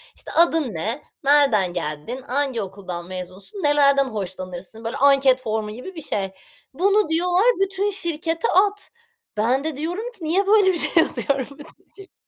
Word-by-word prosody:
İşte, - - -10
adın 325 -7 +2
ne, 220 - -3 0.2
nereden 270 -11 +3
geldin, 170 - -5
hangi 260 -3 0
okuldan 185 -3 -7
mezunsun, 185 - -7
nelerden 280 -1 +4
hoşlanırsın? 190 -1 -5
Böyle 230 - -3
anket 275 -2 +4
formu 220 -2 -3
gibi 255 - -9
bir 320 - -6
şey. 195 -8 -2 0.4
Bunu 400 +4 +2
diyorlar 355 +5 +2 0.2
"Bütün 390 +1 -1
şirkete 330 -4 0
at." 405 +2 +2 0.5
Ben 245 +6 +1
de 315 -3 -3
diyorum 360 +11 -4
ki, 395 -8 -12
niye 375 +6 +1
böyle 415 -1 +5
bir - - +1
şey 325 0 +5
atıyorum 275 -3 -2
bütün 295 - -13
şirkete. 390 -1 -14
280 Hz, 155 wpm, -22 LUFS, 210-345 Hz, 0.5 s, böyle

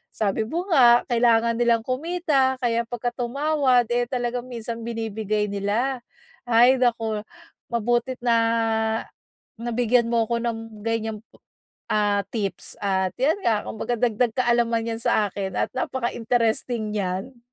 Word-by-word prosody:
sabi 215 +1 0
mo 340 +7 -2
nga, 240 -5 +6
kailangan 230 0 +3
nilang 235 -1 +3
kumita 275 -1 +1
kaya 235 -1 +1
'pagka 240 0 -3
tumawad, 260 0 +1
eh, 240 0 +1
talagang 245 0 -3
minsan 230 -1 -6
binibigay 220 -2 -2
nila. 220 +6 -1 0.5
Ay, 245 +3 +5
nako, 225 -3 +1 0.5
mabuti't 240 +2 0
na 235 -1 +3 1.2
nabigyan 240 0 +1
mo 230 -1 +2
ako 235 +1 -1
ng 225 -2 -5
ganiyang 220 -1 -2
po - - -25 0.5
ah, 205 -2 +1
tips. 200 -3 -3
At 190 -2 0
ayan 315 +7 +3
nga, 215 -2 +2
kumbaga 240 +2 -3
dagdag 235 0 +1
kaalaman 235 -2 +2
'yan 225 - -3
sa 210 -3 +2
akin 190 -1 -4
at - - -1
napaka-interesting 235 -2 -1
niyan. 205 +5 -3
235 Hz, 130 wpm, -24 LUFS, 220-245 Hz, 1.2 s, nga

